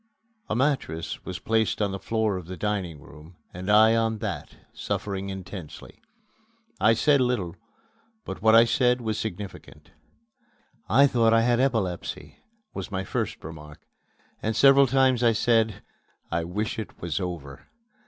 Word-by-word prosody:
A - - 0
mattress 125 - -1
was 95 -1 -5
placed 110 0 0
on 105 -2 0
the 95 - -5
floor 110 -2 0
of 90 -3 -7
the 95 0 -7
dining 95 -6 -2
room 80 +5 -15 0.2
and 90 +3 -6
I 110 +2 +6
on 115 -1 +1
that, - - -5 0.2
suffering 100 -1 -4
intensely. 95 -4 -9 0.8
I 110 +3 +4
said 140 +4 +3
little, 120 -9 -1 0.7
but - - -7
what 110 0 +5
I 115 +1 +8
said 125 +1 +2
was 110 -2 -2
significant. 100 -2 -7 1.0
"I 140 - +6
thought 115 -4 +3
I 115 - +5
had 120 +1 +2
epilepsy!" 110 -10 -2 0.4
was - - -6
my 95 -2 -3
first - - -3
remark; 75 -1 -10 0.6
and 110 0 -1
several 135 +2 +6
times 130 -1 +3
I 115 -2 +4
said, 110 -2 +1 0.5
"I 85 0 -1
wish 105 +6 -3
it 110 - -8
was 85 -3 -3
over!" 85 -7 -6
105 Hz, 150 wpm, -26 LUFS, 90-115 Hz, 1.0 s, I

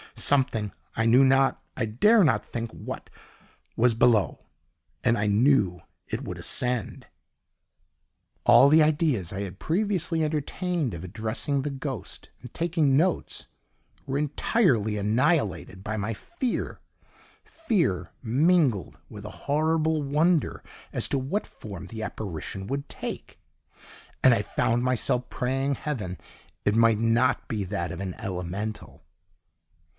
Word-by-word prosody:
Something, 130 -7 +1 0.2
I 110 - +1
knew 120 +4 +6
not, 135 0 +3
I 120 - 0
dare 205 - +4
not 115 -10 +2
think 115 -1 -5
what, - - -8 0.7
was 120 +1 +3
below, 115 -3 +2 0.6
and 120 -1 +3
I 105 0 0
KNEW 105 - +3 0.3
it - - -4
would - - -6
ascend. 125 -4 -2 1.4
All 135 - +7
the 155 +1 +6
ideas 150 - +1
I 95 - -4
had 95 -2 -6
previously 175 -3 0
entertained 155 - -2
of 85 0 -7
addressing 110 +8 -2
the 145 - -3
ghost 135 -3 -6
and 125 - -11
taking 160 -5 +2
notes 180 +4 0 0.6
were 135 0 -2
entirely 140 - +1
annihilated 105 - 0
by 110 +1 -3
my 105 +2 -2
fear 260 - -4 0.6
fear 165 - -1
mingled 130 - +2
with - - -10
a - - -5 0.2
horrible 155 +1 +2
wonder 155 +4 +1 0.3
as - - 0
to - - +1
what 140 +11 -2
form 100 -5 -9
the 110 -1 -6
apparition 95 -2 -5
would 140 +2 -4
take, - - -7 0.8
and 130 - +7
I 115 - +2
found 115 +3 0
myself 125 0 +1
praying 135 +2 -1
Heaven 105 - -4 0.5
it 105 - +2
might 115 -1 +4
not 115 +3 +2
be 105 -3 -2
that 90 -3 -3
of 85 - -6
an 95 -2 -4
ELEMENTAL. 95 +1 -5
125 Hz, 130 wpm, -26 LUFS, 105-150 Hz, 1.4 s, All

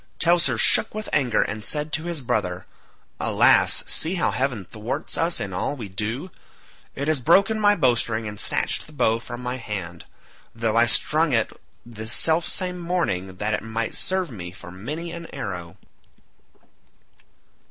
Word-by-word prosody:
Teucer 165 -8 +3
shook 110 - +3
with 215 0 -4
anger 120 -8 +2
and 110 0 -5
said 150 +5 0
to 160 +1 -1
his 170 -4 -1
brother, 95 -7 -2 0.5
"Alas, - - +4
see 165 +4 0
how 175 - +1
heaven 125 -7 -2
thwarts 115 - -4
us 170 +1 +1
in 95 - -4
all 90 +10 -2
we 115 -7 -7
do; 110 - -3 0.6
it 140 +2 -3
has 155 -3 +2
broken 200 - +4
my 205 -1 +4
bowstring 115 - +1
and 105 -1 -7
snatched - - -1
the 155 - -15
bow 115 -5 +2
from 120 +1 -8
my 125 +1 -2
hand, 95 -8 -6 0.5
though 115 -1 -1
I 120 +1 +5
strung 150 +6 +2
it 115 -2 +1 0.3
this 110 -1 -3
self 160 +4 +5
same 180 -1 -2
morning 165 - -2
that 105 +2 -1
it - - -1
might 110 0 -3
serve 185 -5 +1
me 90 -6 -7
for 90 -1 -11
many 150 - -6
an 170 0 -7
arrow." 90 -4 -6
120 Hz, 165 wpm, -24 LUFS, 105-165 Hz, 0.6 s, I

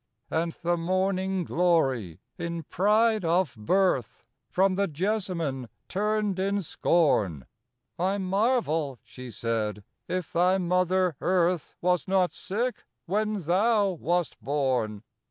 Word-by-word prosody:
IV - - -3
And 165 +1 +1
the 175 0 +1
morning 185 +2 0
glory, 135 - +1
in 170 -1 -4
pride 215 +5 +2
of 170 -2 +1
birth, 125 - 0 0.3
From 190 +1 +2
the 200 +1 +1
jessamine 170 - -2 0.2
turned 210 -1 0
in 200 +1 0
scorn: 105 - +1 0.5
"I 190 +3 +1
marvel," 190 - 0
she 125 -1 -10
said, 110 -2 -2 0.2
"if 185 -2 -3
thy 180 +2 +3
mother 180 -2 +1
earth 180 -3 +1
Was 180 -3 +1
not 185 -1 +2
sick 235 +6 -3 0.2
when 210 +2 -1
thou 200 +5 +2
wast 175 -1 -1
born! 130 -7 -1
180 Hz, 120 wpm, -27 LUFS, 150-195 Hz, 0.5 s, thy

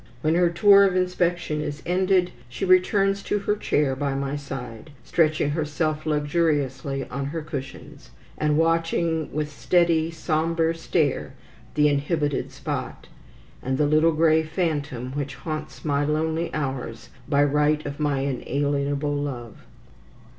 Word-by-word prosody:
When 155 +1 +2
her 175 0 +4
tour 200 +3 +6
of 190 -2 +2
inspection 175 -4 0
is 145 -1 -5
ended, 185 0 +2 0.2
she 130 +10 -3
returns 195 +2 +3
to 205 - -1
her 205 +1 0
chair 145 -9 0
by 140 0 -2
my 140 +1 -2
side, 135 -2 -7
stretching 155 -1 +1
herself 155 0 -2
luxuriously 145 -3 0
on 140 +2 -3
her 155 +3 -4
cushions, 140 -3 -8 0.3
and 150 -1 +1
watching 165 -1 +1
with 150 0 -3
steady, 165 +1 +2
sombre 165 0 0
stare 155 -5 -1 0.4
the 150 0 +4
inhibited 145 0 0
spot, - - -5 0.5
and 130 0 -1
the 150 - +3
little 155 +2 +4
grey 160 0 +4
phantom 150 -6 -2
which 140 -1 -4
haunts 155 +2 -6
my 145 -1 +1
lonely 160 +2 -1
hours 130 -6 -4 0.2
by 145 -1 +4
right 150 +1 +2
of 145 0 -6
my 145 -3 0
inalienable 140 +2 -1
love. 130 -6 -5
150 Hz, 135 wpm, -24 LUFS, 140-165 Hz, 0.5 s, tour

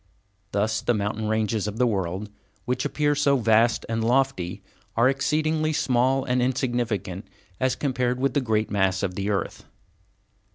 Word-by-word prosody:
Thus 110 +2 0
the 120 - +1
mountain 105 +1 -2
ranges 110 -1 0
of 105 +1 -5
the 125 - +3
world 100 -1 -2 0.3
which 125 +1 -1
appear 145 -1 +1
so 145 -1 +3
vast 115 0 +3
and 115 0 -1
lofty 115 -7 0 0.3
are 120 +2 +5
exceedingly 155 +3 +1
small 130 -1 +2
and 125 -1 +1
insignificant 120 -7 -1 0.3
as 130 0 +1
compared 125 -3 -1
with 135 -1 +1
the 145 - +2
great 110 -3 0
mass 95 -2 +1
of 95 -2 -1
the 100 +2 -3
earth. 100 -2 -2
120 Hz, 155 wpm, -25 LUFS, 105-130 Hz, 0.3 s, are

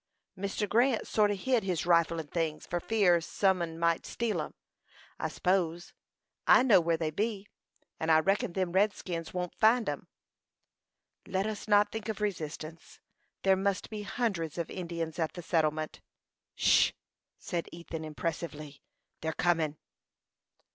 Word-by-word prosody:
"Mr. 200 +2 -2
Grant 235 +3 +2
sort 210 -1 +3
o' 205 - 0
hid 245 +4 +1
his 180 -5 -1
rifle 170 -1 +3
and 150 -2 -7
things, 160 -3 -2
for 175 - -2
fear 180 -4 +3
some 190 +2 +1
un 165 -1 -4
might 170 0 +1
steal 235 -2 -1
'em, - - -7 0.6
I - - -1
s'pose. 175 -2 0 0.5
I 255 - +7
know 220 -8 +6
where 165 0 +1
they 160 -1 -1
be; 205 +3 -2 0.5
and 160 0 +1
I 160 - +7
reckon 195 0 +1
them 185 -2 -1
redskins 185 -4 0
won't 180 -1 -3
find 225 +1 +4
'em." - - -3 1.2
"Let 190 +1 0
us 215 -1 -4
not 205 0 +4
think 220 0 -5
of 220 - -3
resistance. 165 -5 -5 0.4
There 195 -1 +5
must 195 +1 -1
be 215 -1 -4
hundreds 195 -7 -2
of 170 - -3
Indians 170 -2 -4
at 160 -2 0
the 175 - -8
settlement." 155 -2 0 0.5
"'Sh!" - - +4 0.4
said 170 -1 -4
Ethan, 170 -1 -7
impressively. 150 -2 -5 0.4
"They're 160 0 -2
comin'." 160 -4 +1
175 Hz, 150 wpm, -30 LUFS, 165-205 Hz, 1.2 s, I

